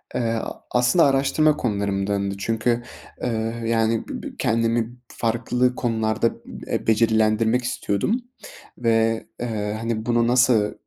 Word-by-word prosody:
Eee, - - +1
a 115 -1 -3
aslında 125 +7 +4
araştırma 140 +3 +3
konularımdandı 100 -2 -1
çünkü, 115 +3 0 0.4
eee, 115 0 -2
yani, 115 0 +1
b - - -6
b - - -4
kendimi 115 +1 0
farklı 125 +2 0
konularda 110 -2 0
b - - -10
eee, - - -2
becerilendirmek 110 +1 +3
istiyordum 120 - -1 0.6
ve, 115 -1 +1
eee, 110 -3 -2
hani, 115 -1 -3
buna 120 -1 +2
nasıl 120 -4 +3
115 Hz, 120 wpm, -23 LUFS, 110-120 Hz, 0.6 s, aslında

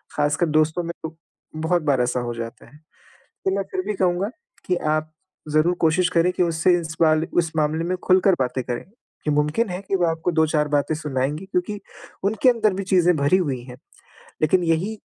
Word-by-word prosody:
ख़ासकर 150 +4 +1
दोस्तों 155 +3 +1
में 170 - -4
तो 160 0 -6 0.4
बहुत 160 +2 0
बार 140 -4 +2
ऐसा 125 +1 0
हो 120 -1 -3
जाता 115 +2 -7
है। 145 - -18 0.7
तो 190 - +2
मैं 200 - 0
फिर 185 - -1
भी 210 - 0
कहूँगा 185 +2 +1 0.4
कि 180 - +1 0.2
आप 155 0 -3 0.4
ज़रूर 155 +4 +3
कोशिश 175 +3 +3
करें 175 +1 +2
कि 180 - +1
उससे 170 +1 +2
इस 165 -1 -6
वाले 155 0 +4
उस 165 -2 +2
मामले 155 +2 +1
में 185 +1 0
खुलकर 185 +1 +4
बातें 130 0 -1
करें। 120 +3 -4 0.4
कि 150 - 0
मुमकिन 150 +9 +1
है 180 - -4
कि 195 - +1
वो 175 -2 +2
आपको 165 +1 -1
2-4 155 -2 +2
बातें 145 +2 +2
सुनाएँगी 150 +2 -2
क्योंकि 195 +2 -2 0.4
उनके 220 +5 +3
अंदर 220 -4 +2
भी 195 +1 -3
चीज़ें 180 -2 +3
भरी 140 +6 +3
हुई 140 -9 -1
है। 125 0 -10 0.7
लेकिन 175 +4 +3
यही 170 +6 0
165 Hz, 195 wpm, -23 LUFS, 150-180 Hz, 0.7 s, वाले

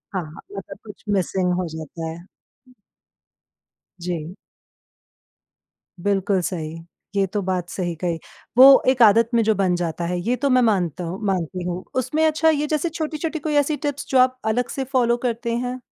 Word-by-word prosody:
हाँ, 185 - 0 0.3
मतलब - - -8
कुछ - - -12
मिसिंग 185 -1 +1
हो 180 - -2
जाता 160 +1 -7
है। 160 +1 -6 1.8
जी। 170 0 -4 1.7
बिल्कुल 195 0 +1
सही, 165 -3 -4 0.4
ये 200 -1 +3
तो 205 +2 -2
बात 185 -2 -2
सही 175 -3 -3
कही। 170 -2 -1 0.4
वो 270 +1 +9
एक 260 -1 +2
आदत 225 +2 +6
में 235 - +4
जो 220 0 +2
बन 185 -2 +1
जाता 170 -1 -2
है, 175 +1 -2
ये 235 +8 0
तो 280 +2 0
मैं 255 0 +4
मानता 185 - +1
हूँ 175 +3 -5
मानती 180 -2 -1
हूँ। 180 +1 -4
उसमें 260 +5 +1
अच्छा 315 +1 +3
ये 300 -1 +1
जैसे 310 +2 0
छोटी-छोटी 320 0 -3
कोई 300 +1 -2
ऐसी 295 +1 -2
टिप्स 285 -1 -4
जो 260 - +4
आप 255 0 +3
अलग 235 +3 +1
से 270 - -3
फॉलो 240 -2 +3
करते 235 0 -2
हैं? 250 +1 -3
205 Hz, 170 wpm, -22 LUFS, 180-255 Hz, 1.8 s, वो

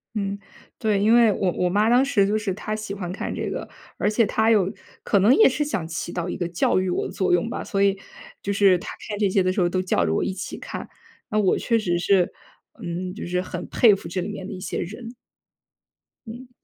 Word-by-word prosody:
嗯， 200 -1 -2 0.4
对。 210 -3 +1
因 215 +3 +4
为 235 -3 +6
我 190 -1 0
我 180 +1 0
妈 205 +4 +2
当 245 +2 +5
时 245 -8 +2
就 210 +2 +1
是 205 -3 -2
她 215 +2 -4
喜 215 -2 -5
欢 180 -3 -5
看 195 - -4
这 - - -3
个， - - -5 0.3
而 - - +1
且 220 +1 +3
她 220 +3 +1
有 195 -4 +3 0.3
可 200 - +2
能 215 +7 +5
也 440 - +7
是 280 +3 0
想 220 - -3
起 165 +1 -4
到 175 -1 -3
一 - - -3
个 175 - -2
教 175 +1 +1
育 185 0 -1
我 180 - -1
的 - - -5
作 190 - 0
用 175 +5 +2
吧， - - -4
所 200 -2 0
以， 195 -1 +2 0.4
就 200 - -2
是 195 -2 +4
她 - - -8 0.2
看 205 -1 -4
这 205 - +2
些 190 0 +2
的 185 - +1
时 190 - 0
候 175 - +2
都 185 +1 0
叫 180 - +1
着 80 - 0
我 - - +1
一 190 - -2
起 185 - -6
看。 - - -7 0.4
那 215 -2 +1
我 195 -3 +3
确 230 - +1
实 175 -6 0
是， 180 0 +2 0.5
嗯， 180 +1 -4
就 210 - -7
是 180 +1 0
很 180 -1 -6
佩 225 -4 +5
服 190 -3 -4
这 185 - -3
里 190 - -4
面 190 -2 -6
的 - - -6
一 185 - -7
些 185 - -4
人。 225 +6 -6 1.1
嗯。 240 +3 -9
195 Hz, 265 characters per minute, -23 LUFS, 180-215 Hz, 1.1 s, 也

